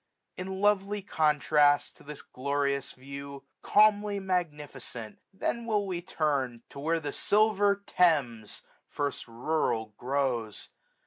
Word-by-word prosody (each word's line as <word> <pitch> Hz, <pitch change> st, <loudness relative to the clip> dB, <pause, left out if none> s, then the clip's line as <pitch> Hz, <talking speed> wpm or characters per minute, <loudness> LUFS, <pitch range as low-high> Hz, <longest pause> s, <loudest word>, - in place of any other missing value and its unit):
In 190 Hz, +1 st, -5 dB
lovely 205 Hz, 0 st, +2 dB
contrast 150 Hz, -3 st, +3 dB
to -, -, -17 dB
this 150 Hz, 0 st, -9 dB
glorious 140 Hz, 0 st, -2 dB
view. 140 Hz, +1 st, -9 dB, 0.2 s
Calmly 210 Hz, -1 st, +4 dB
magnificent, 150 Hz, -, -4 dB
then 235 Hz, +4 st, -3 dB
will 210 Hz, -3 st, +1 dB
we 180 Hz, -3 st, -3 dB
turn 140 Hz, -9 st, -1 dB
To -, -, -9 dB
where 165 Hz, +3 st, 0 dB
the 145 Hz, -3 st, -5 dB
silver 205 Hz, -1 st, +2 dB
Thames 135 Hz, -11 st, +1 dB, 0.2 s
first 145 Hz, -3 st, -3 dB
rural 115 Hz, -3 st, -1 dB
grows. 125 Hz, -5 st, -2 dB
150 Hz, 115 wpm, -29 LUFS, 140-190 Hz, 0.2 s, Calmly